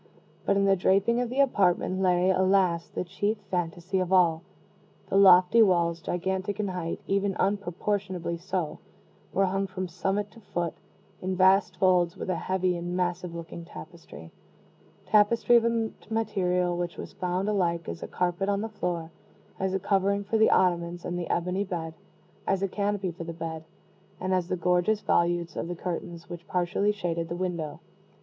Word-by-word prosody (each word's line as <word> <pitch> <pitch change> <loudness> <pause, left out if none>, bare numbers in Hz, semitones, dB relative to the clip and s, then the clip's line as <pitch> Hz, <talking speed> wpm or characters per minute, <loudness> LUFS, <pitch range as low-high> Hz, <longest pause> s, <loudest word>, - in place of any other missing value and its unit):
But 200 - +3
in 200 - +3
the 195 0 +5
draping 195 +6 +2
of 245 - -2
the 265 +3 +2
apartment 190 -6 +2
lay, 180 0 +3
alas! 185 -3 +2
the - - -3
chief 205 +4 -1
phantasy 175 +1 -1
of 185 0 -2
all. 170 -4 +4 0.7
The - - -1
lofty 185 +2 +7
walls, 170 -4 +3
gigantic 190 +4 -2
in 205 -2 -1
height 180 -3 -4
even 195 -1 0
unproportionably 190 -3 -1
so 180 -3 -3 0.5
were 195 - +2
hung 195 +1 -1
from 185 -1 -4
summit 195 +4 -2
to 230 - -15
foot, 175 -5 -3 0.5
in 185 0 -2
vast 190 +2 +4
folds, 180 -1 +3
with 185 - -3
a - - 0
heavy 185 0 0
and 175 +1 -3
massive 180 -1 -2
looking 170 0 -7
tapestry 80 - -11 0.7
tapestry 220 +3 +4
of 230 - +2
a 230 -1 0 0.2
material 180 -5 0
which 175 0 -3
was - - -8
found 180 +2 -2
alike 170 -5 0
as 85 0 -6
a - - -5
carpet 180 +2 -1
on 200 0 +1
the 225 - -3
floor, 175 -6 -3 0.5
as 190 0 0
a - - 0
covering 200 +1 +1
for 220 +2 0
the 220 - +6
ottomans 175 -1 +1
and 175 - -3
the 175 - -5
ebony 180 +3 0
bed, 165 -4 -4 0.5
as 195 0 +1
a - - +2
canopy 200 -1 -1
for 170 0 -8
the 165 0 -6
bed, 160 -1 -6 0.5
and 185 +1 -1
as 180 -2 +1
the 185 - -1
gorgeous 180 +5 +2
volutes 175 0 +1
of - - -3
the 175 - -4
curtains 170 -1 -5
which 175 -1 -9
partially 180 +3 +1
shaded 170 -5 -3
the 170 - -3
window. 170 -5 -3
185 Hz, 175 wpm, -27 LUFS, 175-195 Hz, 0.7 s, lofty